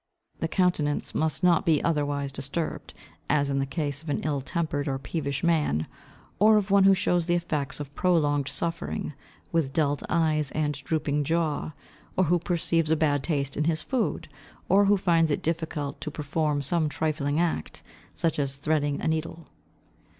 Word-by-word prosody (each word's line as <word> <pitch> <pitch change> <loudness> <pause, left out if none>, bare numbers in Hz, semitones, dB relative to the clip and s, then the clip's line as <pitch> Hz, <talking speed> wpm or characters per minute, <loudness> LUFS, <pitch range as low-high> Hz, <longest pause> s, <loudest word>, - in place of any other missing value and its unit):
The - - 0
countenance 175 -6 0
must 155 +1 0
not 175 -2 +4
be 160 -3 +2
otherwise 145 -3 0
disturbed, 140 +4 -4 0.3
as 145 -1 +2
in 140 - +1
the 135 - -1
case 145 -1 -3
of 160 - -9
an 145 - -1
ill 145 -2 -1
tempered 150 -1 -2
or 135 -1 -1
peevish 140 0 -3
man, 150 - +2 0.5
or 215 +2 +6
of 205 -1 -1
one 200 -1 +6
who 195 0 +7
shows 175 -2 +1
the 175 - +3
effects 155 -5 -2
of 145 -1 -7
prolonged 145 -6 +2
suffering, 170 -2 -3 0.4
with 160 -5 0
dulled 145 -2 +1
eyes 155 -3 +1
and 150 -1 0
drooping 145 +1 -1
jaw, 160 0 -1 0.4
or 190 - +4
who 175 +1 +2
perceives 165 -2 0
a 160 - +4
bad 145 -3 +1
taste 140 -2 -1
in 150 - 0
his 155 -1 0
food, 255 -3 -1 0.4
or 200 +1 +5
who 205 +1 +4
finds 165 -4 +3
it 145 - -1
difficult 160 -3 -3
to - - -3
perform 150 0 -1
some 155 +2 +1
trifling 150 -1 -1
act, 170 - -2 0.3
such 165 -2 -1
as 140 -1 -1
threading 145 -1 0
a - - -1
needle. 160 +1 -3
155 Hz, 170 wpm, -27 LUFS, 145-170 Hz, 0.5 s, who